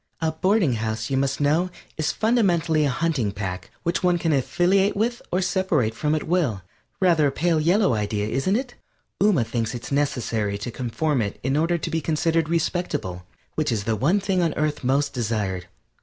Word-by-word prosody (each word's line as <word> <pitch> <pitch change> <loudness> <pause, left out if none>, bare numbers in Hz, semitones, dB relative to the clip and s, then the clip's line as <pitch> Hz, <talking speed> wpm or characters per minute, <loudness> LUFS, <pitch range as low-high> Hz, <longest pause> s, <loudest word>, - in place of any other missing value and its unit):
A 160 -1 0
Boarding 185 - +2
House, 110 +2 -3
you 135 - +1
must 135 0 0
know, 155 +5 +2 0.3
is 155 - 0
fundamentally 175 -9 +2
a - - +2
hunting 140 -7 0
pack 95 -2 -5
which 170 +1 0
one 180 -1 +3
can 165 -2 0
affiliate 185 +8 +2
with 235 +3 0
or 185 +1 +1
separate 165 - +1
from 150 +6 0
at 155 - -2
will. 155 - 0 0.4
Rather 170 -6 +4
a - - 0
pale 165 +3 +1
yellow 175 - +3
idea, 105 -1 -1
isn't 135 - 0
it? 250 +1 -2 0.5
Ooma 195 - +4
thinks 115 0 -2
it 120 - -7
necessary 115 -7 0
to 115 +4 -5
conform 130 +4 -1
to 110 - +1
it - - -9
in 135 +2 0
order 165 +3 +2
to - - -4
be 160 - 0
considered 160 0 +1
respectable, 150 - -2 0.3
which 155 -4 0
is 110 -3 -1
the 110 +1 0
one 150 - +2
thing 195 -2 0
on 165 -3 0
Earth 150 -2 -1
most 140 +2 +1
desired. 105 -7 -2
150 Hz, 190 wpm, -24 LUFS, 115-175 Hz, 0.5 s, Rather